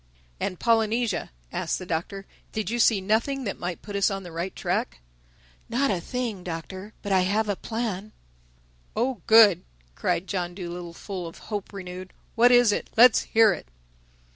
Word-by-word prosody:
"And 180 - -3
Polynesia," 225 -2 +1 0.2
asked - - -1
the 185 - -7
Doctor, 180 +4 -3 0.3
"did 215 0 -2
you 240 - -1
see 220 -4 +4
nothing 230 +7 0
that 200 - -4
might 175 -1 -4
put 205 -1 -7
us 200 -1 +3
on 195 -1 -4
the 175 - -9
right 170 +3 -4
track?" 65 - -2 0.7
"Not 255 +3 +1
a 180 -3 -1
thing, 235 -4 -4
Doctor—But 190 +5 -7
I 190 - +5
have 205 +4 +1
a 205 - 0
plan." 215 -2 -4 0.8
"Oh 245 +3 -1
good!" 220 -6 +7 0.3
cried 170 - -1
John 175 -3 -3
Dolittle, 175 -2 -7
full 185 -3 -6
of 165 - -10
hope 205 -3 -5
renewed. 185 -2 -8 0.2
"What 240 +1 +5
is 245 -3 +6
it? - - -2
Let's 240 0 +7
hear 220 -3 +4
it." - - -9
200 Hz, 165 wpm, -26 LUFS, 180-225 Hz, 0.8 s, good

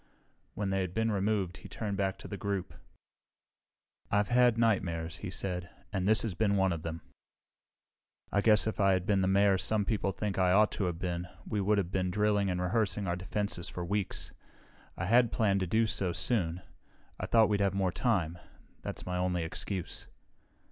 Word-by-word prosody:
When 100 -2 -2
they 95 0 +1
had 90 -1 -4
been 110 0 +1
removed 100 -4 0
he - - -12
turned 105 -2 -3
back 95 -1 -1
to - - -10
the 100 - -5
group. 100 -2 -3 1.4
"I've 105 0 +1
had 125 -1 +4
nightmares," 85 -8 0
he 100 - -6
said, 90 -1 -4 0.2
"and 95 -1 0
this 110 +1 +5
has 110 -5 -2
been 100 +2 +1
one 95 -1 +3
of 80 - -5
them. 80 0 -5 1.3
I 100 - +2
guess 105 -1 +5
if 110 - -3
I 100 -1 +4
had 95 -1 0
been 100 -1 +2
the 95 - +2
Mayor 100 0 +4
some 105 +2 +1
people 100 -2 0
think 100 -1 -3
I 90 -1 +4
ought 105 +2 +5
to 100 - -2
have 85 -2 -2
been, 90 0 -3 0.2
we 105 -2 -1
would 105 +2 +2
have 95 -3 -1
been 95 -1 0
drilling 105 0 +1
and 90 -1 -1
rehearsing 100 +2 0
our 85 -1 0
defenses 95 -1 -2
for 90 - -5
weeks. 100 +2 -2 0.6
I - - -2
had 120 +3 +4
planned 100 -3 +2
to 95 - -1
do 110 +5 +3
so 95 -4 -1
soon. 90 -7 0 0.6
I - - -3
thought 110 -2 +5
we'd 105 -1 +1
have 100 -1 +1
more 95 -2 +1
time; 90 -7 0 0.4
that's - - -6
my 90 0 -2
only 90 -1 0
excuse. 90 +3 -4
95 Hz, 195 wpm, -31 LUFS, 90-105 Hz, 1.4 s, this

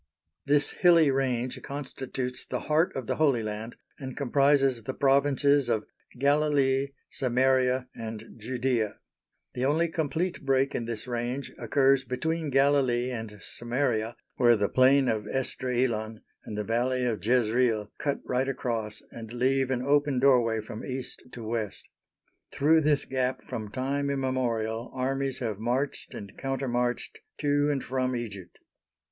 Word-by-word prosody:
This 145 0 +3
hilly 170 -5 +5
range 130 -2 -1
constitutes 130 -2 -5
the 125 - -3
heart 155 +4 +2
of 130 - -3
the - - -2
Holy 140 -7 +3
Land 110 +2 -5 0.2
and 130 -2 -7
comprises 135 -2 +3
the 130 +4 -5
provinces 140 -1 +3
of 110 -2 0 0.3
Galilee, 140 -1 +2 0.2
Samaria, 130 0 +2
and 110 0 -7
Judæa. 125 -2 -1 0.6
The 125 - -1
only 160 +5 +2
complete 160 +3 -2
break 135 0 +2
in 115 - -2
this 115 -2 -4
range 125 +3 -3
occurs 135 -1 +3
between 160 +5 -2
Galilee 135 -3 +3
and 110 -3 -6
Samaria, 120 -2 -1 0.2
where 120 -2 +5
the 100 -1 +1
Plain 130 +1 +5
of 105 -3 -1
Esdraelon 120 -4 -1 0.2
and 105 - -6
the 105 - -1
Valley 125 +3 0
of 115 -3 -2
Jezreel 115 -2 +2
cut 140 -1 -1
right 130 +2 0
across 115 -5 -2
and 115 -1 -9
leave 130 +2 +1
an 125 -1 -1
open 145 0 +2
doorway 120 -4 +4
from 110 +1 -8
East 130 -1 -5
to 120 - -8
West. 110 -3 -3 0.6
Through 160 +3 +4
this 150 -2 +2
gap 130 -1 -1
from 110 -2 -5
time 140 +4 -1
immemorial 125 -4 -1
armies 135 +1 -1
have 110 -4 -2
marched 125 +5 -2
and 100 -1 -9
counter 135 0 -2
marched 120 0 -1 0.2
to 145 0 +2
and 140 -2 -1
from 130 -1 -1
Egypt. 100 -7 -6
130 Hz, 140 wpm, -28 LUFS, 120-140 Hz, 0.6 s, hilly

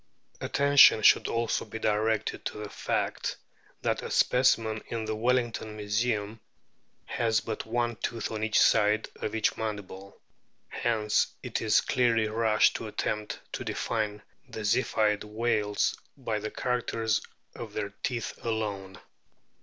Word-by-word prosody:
Attention 140 -6 +6
should - - +6
also 115 0 0
be - - -7
directed 110 0 0
to - - -4
the 105 -1 -7
fact - - -2 0.5
that - - 0
a - - -6
specimen 115 -4 +2
in 115 -1 -3
the 110 0 -2
Welling 120 +1 +1
ton 110 -1 -7
Museum 105 0 -1 0.7
has 110 -2 +1
but 110 +1 -5
one 120 +1 0
tooth 115 -2 -3
on 110 -1 -3
each 110 -1 +2
side 105 +1 +4
of 110 - -4
each 110 - +1
mandible, 100 -3 -6 0.5
hence 110 -3 +1 0.2
it - - -3
is 110 -2 +4
clearly 120 -4 +2
rash 110 0 +3
to - - -5
attempt 105 0 -3
to - - -4
define 105 -2 -2 0.3
the 110 - -6
Ziphioid 105 -1 +1
whales 105 -1 0 0.2
by 115 -5 -2
the 110 +1 -4
characters 115 -3 -1 0.3
of 110 -3 -8
their 105 -1 -3
teeth 120 -3 -2
alone. 100 -4 -3
110 Hz, 140 wpm, -28 LUFS, 105-115 Hz, 0.7 s, Attention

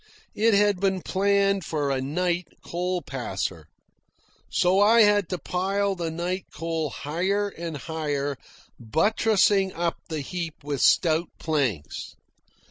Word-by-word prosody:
It 225 0 +3
had 205 -2 +3
been 190 -2 0
planned 200 0 +2
for 145 -3 -1
a 130 -1 0
night 175 +5 -1 0.2
coal 180 +1 -2
passer. 95 - -4 0.8
So 185 +2 +3
I 225 +3 +6
had 205 -3 +4
to 180 - -2
pile 195 +4 -1
the 170 -3 -3
night 175 +3 -3
coal 165 -2 -2
higher 185 +10 -1
and 165 -4 -6
higher, 145 -2 -2 0.4
buttressing 195 - +2
up 170 0 -1
the 155 -2 -3
heap 165 +1 -5
with 145 -2 -3
stout 165 0 +4
planks. 125 - -2
175 Hz, 130 wpm, -25 LUFS, 150-195 Hz, 0.8 s, I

